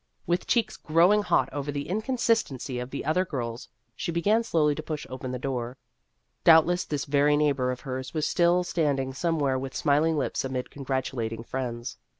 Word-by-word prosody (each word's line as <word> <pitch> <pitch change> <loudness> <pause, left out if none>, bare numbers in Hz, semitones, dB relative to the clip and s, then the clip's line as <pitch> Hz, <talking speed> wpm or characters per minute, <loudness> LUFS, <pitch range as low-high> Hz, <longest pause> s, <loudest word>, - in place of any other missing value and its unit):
With 175 +1 -1
cheeks 235 -3 +1
growing 175 +7 +4
hot - - +2
over 145 0 -3
the 145 0 -4
inconsistency 215 - 0
of 125 +1 -5
the 140 - -5
other 170 +4 +2
girls, 120 -8 -5 0.3
she - - -3
began 205 +7 +2
slowly 155 -8 +2
to 155 - -5
push 155 -1 -5
open 130 0 -5
the 125 - -3
door. 125 -1 -4 0.7
Doubtless 170 +2 +5
this 145 -2 -3
very 145 +1 +3
neighbor 140 -4 +1
of 125 -1 -4
hers 130 -1 -5
was 155 -2 -1
still 175 +1 +3
standing 140 -6 0
somewhere 145 -3 0
with 130 0 -6
smiling 155 +2 +2
lips 140 - -1
amid 130 -1 -4
congratulating 130 -5 -3
friends. 120 -1 -5
145 Hz, 170 wpm, -27 LUFS, 130-165 Hz, 0.7 s, Doubtless